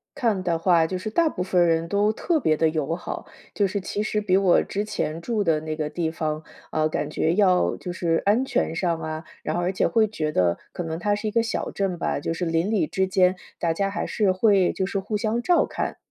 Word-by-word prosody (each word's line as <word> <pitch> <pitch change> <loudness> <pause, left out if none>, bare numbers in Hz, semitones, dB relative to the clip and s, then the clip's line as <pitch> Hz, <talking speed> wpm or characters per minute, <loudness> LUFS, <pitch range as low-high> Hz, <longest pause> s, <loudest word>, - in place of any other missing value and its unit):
看 220 -6 0
的 170 -2 +1
话， 165 -1 +3
就 185 - -3
是 185 +4 -4
大 330 +7 +3
部 180 - -3
分 180 -2 +3
人 165 0 +1
都 205 +3 +2
特 320 +9 0
别 155 - +2
地 160 0 +3
友 155 0 -1
好。 175 - -6 0.3
就 205 - +2
是 200 +2 -2
其 200 +2 -3
实 215 0 0
比 200 -3 +1
我 190 -2 +4
之 205 - -3
前 165 -6 -3
住 215 +2 -1
的 165 -4 +2
那 155 0 -4
个 155 -1 -2
地 160 +1 -2
方， 155 -1 -3 0.3
啊， 155 0 +1
感 155 -1 -2
觉 160 +2 +1
要 185 -3 +3
就 180 - -6
是 170 -2 0
安 215 +6 +3
全 265 -10 -1
上 170 -1 0
啊 155 0 -4 0.2
然 155 - -2
后 175 - 0
而 175 +1 0
且 190 - +1
会 225 -2 +3
觉 155 -8 -3
得， 90 -8 +2
可 - - -5
能 160 -1 -4
它 205 +4 0
是 210 +1 -2
一 - - -1
个 230 +1 +2
小 230 - -2
镇 190 -3 -2
吧， - - -1
就 155 - -2
是 175 +2 -3
邻 165 +4 0
里 205 -8 +1
之 190 - 0
间 185 0 +3 0.2
大 165 -1 +1
家 195 +4 0
还 200 - -3
是 205 -4 +2
会 190 -1 +3
就 190 - -1
是 195 - -2
互 210 +2 -2
相 220 +2 0
照 350 +7 +3
看。 - - -3
185 Hz, 270 characters per minute, -24 LUFS, 165-205 Hz, 0.3 s, 我